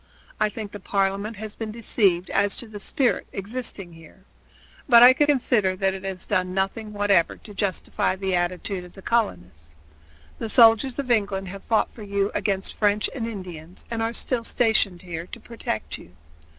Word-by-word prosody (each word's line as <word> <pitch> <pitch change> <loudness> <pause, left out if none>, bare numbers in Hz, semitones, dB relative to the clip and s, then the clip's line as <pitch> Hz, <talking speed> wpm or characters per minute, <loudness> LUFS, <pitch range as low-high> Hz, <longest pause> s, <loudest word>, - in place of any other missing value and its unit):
I 215 - +3
think 210 -1 -7
that 205 -2 -9
Parliament 200 +2 0
has 210 +1 -6
been 225 -1 -5
deceived 200 -5 +1
as 200 0 +2
to 240 - -5
the 210 -1 -9
spirit 255 +5 0
existing 200 -3 -5
here. 165 +3 -16 0.7
But 235 -1 +9
I 250 +1 +10
consider 250 -9 +2
that 190 0 +1
it 190 0 -7
has 190 -1 -5
done 185 -2 0
nothing 195 +3 -2
whatever 205 -4 +2
to 210 - -13
justify 195 -2 -1
the 190 0 -2
attitude 180 +1 -1
of 180 - -13
the 195 - -13
colonists. 90 - -2 0.6
The 225 - -3
soldiers 230 +3 +5
of 270 -3 -2
England 200 -4 0
have 195 +1 -8
fought 225 - +1
for 230 - -12
you 200 0 -1
against 200 -2 -1
French 210 0 +1
and 235 -4 -3
Indians 180 -6 -8
and 230 -1 -2
are 225 0 0
still 240 0 -2
stationed 220 -7 +1
here 170 -1 -6
to - - -9
protect 110 - -5
you. 90 - -15
200 Hz, 175 wpm, -24 LUFS, 185-225 Hz, 0.7 s, I